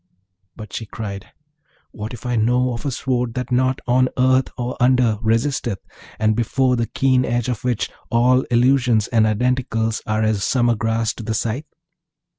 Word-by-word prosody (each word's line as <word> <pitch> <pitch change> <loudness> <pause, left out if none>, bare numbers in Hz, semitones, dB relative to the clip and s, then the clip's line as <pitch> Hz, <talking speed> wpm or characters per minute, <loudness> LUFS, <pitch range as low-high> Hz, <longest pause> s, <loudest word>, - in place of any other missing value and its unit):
But 110 -2 -10
she 110 - -5
cried, 100 -2 -6 0.6
'What 105 0 -6
if 120 0 -10
I 125 -1 -1
know 125 +3 +2
of 115 +5 -5
a - - -1
sword 125 -2 -2
that 125 -1 -4
nought 130 +1 +1
on 130 +1 +3
earth 130 0 +3
or 125 +1 -3
under 125 -3 +3
resisteth, 115 -1 0 0.4
and 110 0 +2
before 125 +3 +1
the 115 -1 -1
keen 130 -1 +2
edge 120 0 -1
of 120 -4 -3
which 125 -3 0 0.2
all 125 +2 +3
Illusions 120 -2 +3
and 110 -2 +3
Identicals 115 0 0
are 110 0 0
as 110 -2 0
summer 120 -2 +2
grass 115 0 -1
to 115 - -9
the 110 +1 -2
scythe?' 115 +7 -2
120 Hz, 170 wpm, -20 LUFS, 110-125 Hz, 0.6 s, on